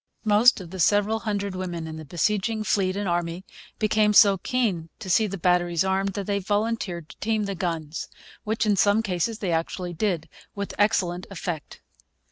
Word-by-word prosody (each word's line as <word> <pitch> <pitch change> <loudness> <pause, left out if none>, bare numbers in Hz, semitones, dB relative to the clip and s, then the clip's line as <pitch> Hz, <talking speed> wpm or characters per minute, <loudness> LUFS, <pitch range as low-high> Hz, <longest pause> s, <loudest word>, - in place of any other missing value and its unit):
Most 215 +4 +5
of 175 -3 -9
the 190 - -7
several 205 +4 +3
hundred 200 -3 -2
women 175 -3 -4
in 160 0 -7
the 155 - -8
besieging 210 +8 0
fleet 190 -2 +1
and 200 0 -2
army 175 +1 -2 0.3
became 215 -1 +2
so 200 -2 +7
keen 195 -9 -1
to 185 - -5
see 220 +4 +4
the 195 0 -5
batteries 175 -1 +2
armed 190 +1 0
that 200 -1 -4
they 200 0 0
volunteered 205 -4 -2
to - - -13
team 220 0 0
the 200 -1 -2
guns, 165 -4 -4 0.3
which, 220 +1 0
in 210 -1 +3
some 205 +3 +3
cases, 195 +3 -1
they 195 -5 -2
actually 175 +2 -2
did, 175 -3 -1 0.3
with 200 -1 -4
excellent 185 -4 +1
effect. 175 -5 -6
195 Hz, 180 wpm, -25 LUFS, 175-210 Hz, 0.3 s, so